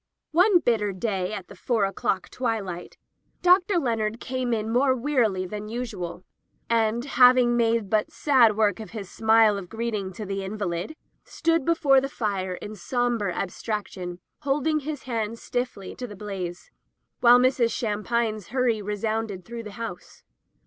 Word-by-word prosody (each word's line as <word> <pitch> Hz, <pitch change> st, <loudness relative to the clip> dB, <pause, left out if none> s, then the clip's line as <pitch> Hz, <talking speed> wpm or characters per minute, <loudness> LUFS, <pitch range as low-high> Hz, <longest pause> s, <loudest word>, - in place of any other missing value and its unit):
One 360 Hz, +4 st, +5 dB
bitter 220 Hz, -, +1 dB
day, 190 Hz, -1 st, -2 dB
at 195 Hz, -4 st, -6 dB
the 200 Hz, -, -12 dB
four 220 Hz, +2 st, +1 dB
o'clock 195 Hz, -1 st, -2 dB
twilight. 210 Hz, -8 st, -3 dB, 0.5 s
Dr. 360 Hz, +1 st, +5 dB
Leonard 225 Hz, -6 st, -1 dB
came 255 Hz, -1 st, -2 dB
in 220 Hz, -1 st, -1 dB
more 260 Hz, +2 st, +3 dB
wearily 235 Hz, -8 st, +1 dB
than 210 Hz, +3 st, -6 dB
usual, 215 Hz, -7 st, -5 dB, 0.5 s
and, 230 Hz, +1 st, +2 dB
having 250 Hz, -2 st, +5 dB
made 230 Hz, -2 st, +2 dB
but 215 Hz, +1 st, +1 dB
sad 240 Hz, -7 st, +4 dB
work 210 Hz, -2 st, +2 dB
of 220 Hz, -, -7 dB
his 195 Hz, -3 st, -7 dB
smile 220 Hz, -2 st, +4 dB
of 180 Hz, -3 st, -10 dB
greeting 220 Hz, -4 st, -3 dB
to 215 Hz, -, -6 dB
the 195 Hz, 0 st, -3 dB
invalid, 190 Hz, -, -3 dB, 0.3 s
stood 330 Hz, -2 st, 0 dB
before 290 Hz, -5 st, +4 dB
the 275 Hz, -, -3 dB
fire 195 Hz, -7 st, -2 dB
in 205 Hz, -, -8 dB
sombre 235 Hz, -1 st, -1 dB
abstraction, 185 Hz, -1 st, -4 dB, 0.2 s
holding 300 Hz, +2 st, +1 dB
his 295 Hz, -1 st, -5 dB
stiff -, -, -19 dB
hands 230 Hz, -2 st, -4 dB, 0.5 s
to 250 Hz, -, -5 dB
the 205 Hz, -, -9 dB
blaze, 190 Hz, -4 st, -6 dB, 0.5 s
while 245 Hz, 0 st, +7 dB
Mrs. 250 Hz, -2 st, +3 dB
Sham 210 Hz, -2 st, -2 dB
pine's 220 Hz, -4 st, -1 dB
hurry 245 Hz, -4 st, +1 dB
resounded 210 Hz, -1 st, -3 dB
through 235 Hz, 0 st, -6 dB
the 210 Hz, -3 st, -9 dB
house. 200 Hz, -5 st, -8 dB
225 Hz, 155 wpm, -25 LUFS, 200-250 Hz, 0.5 s, while